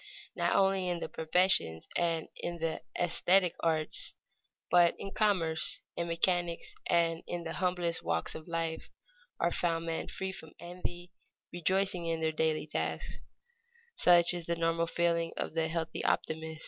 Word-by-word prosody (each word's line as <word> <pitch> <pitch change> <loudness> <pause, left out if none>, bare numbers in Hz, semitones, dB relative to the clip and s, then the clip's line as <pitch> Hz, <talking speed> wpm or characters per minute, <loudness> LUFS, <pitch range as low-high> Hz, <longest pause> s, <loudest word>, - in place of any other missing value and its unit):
Not - - +1
only 195 -2 +3
in 175 -1 -1
the - - -4
professions 160 - +2
and 165 -2 0
in 175 0 -4
the 165 -1 -2 0.2
esthetic 180 +1 +3
arts, 160 -2 0 0.6
but 175 -1 +5
in 195 - -6
commerce, 180 -8 +1
in 170 - -2
mechanics, 170 0 0
and 165 -1 +2
in 175 -1 -4
the 165 - -5
humblest 180 -2 -1
walks 85 0 -1
of 160 +1 -9
life 165 -1 -3 0.5
are 170 - +2
found 165 -1 0
men 165 -1 -3
free 190 0 -4
from 160 -4 -11
envy, 175 0 -6 0.4
rejoicing 180 0 +1
in 165 -1 -1
their 160 0 +1
daily 155 -1 0
tasks. 155 - -3 0.8
Such 175 -1 +6
is 175 -2 -5
the 170 - +1
normal 165 0 +1
feeling 170 0 0
of - - -3
the 160 0 +1
healthy 165 0 -3
optimist. 160 0 -1
170 Hz, 150 wpm, -31 LUFS, 160-175 Hz, 0.8 s, Such